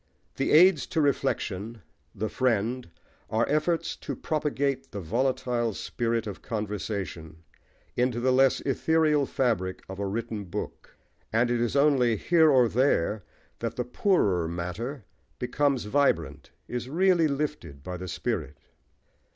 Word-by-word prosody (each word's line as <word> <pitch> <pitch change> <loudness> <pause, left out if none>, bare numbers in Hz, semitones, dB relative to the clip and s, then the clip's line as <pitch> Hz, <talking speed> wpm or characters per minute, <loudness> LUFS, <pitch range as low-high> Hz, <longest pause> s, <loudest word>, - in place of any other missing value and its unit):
The 135 - 0
Aids 170 -1 +6
to - - -1
Reflection, 115 -7 -1 0.3
The 110 - -2
Friend, 120 0 0 0.4
are 110 +2 +1
efforts 160 +2 0
to - - -5
propagate 140 - -1
the 100 - -6
volatile 120 +3 -1
spirit 115 -1 -2
of 105 -3 -7
conversation 100 -7 -5 0.5
into 125 -1 +1
the 130 +2 +2
less 135 0 +4
ethereal 150 0 +2
fabric 105 -8 -1
of 95 +1 -8
a 100 - -1
written 110 0 -4
book; 100 +4 -7 0.3
and 120 +2 +2
it 120 -1 +1
is 120 +2 0
only 140 -5 +4
here 160 - +4
or 130 -4 +5
there 110 -5 +1 0.4
that 115 0 -3
the 125 - -2
poorer 105 - +1
matter 90 - -5 0.3
becomes 135 +1 0
vibrant, 85 - 0 0.2
is 125 +1 -4
really 175 +1 +3
lifted 140 - -4
by 90 +2 -5
the 90 +1 -6
spirit. 85 - -3
120 Hz, 135 wpm, -27 LUFS, 100-140 Hz, 0.5 s, Aids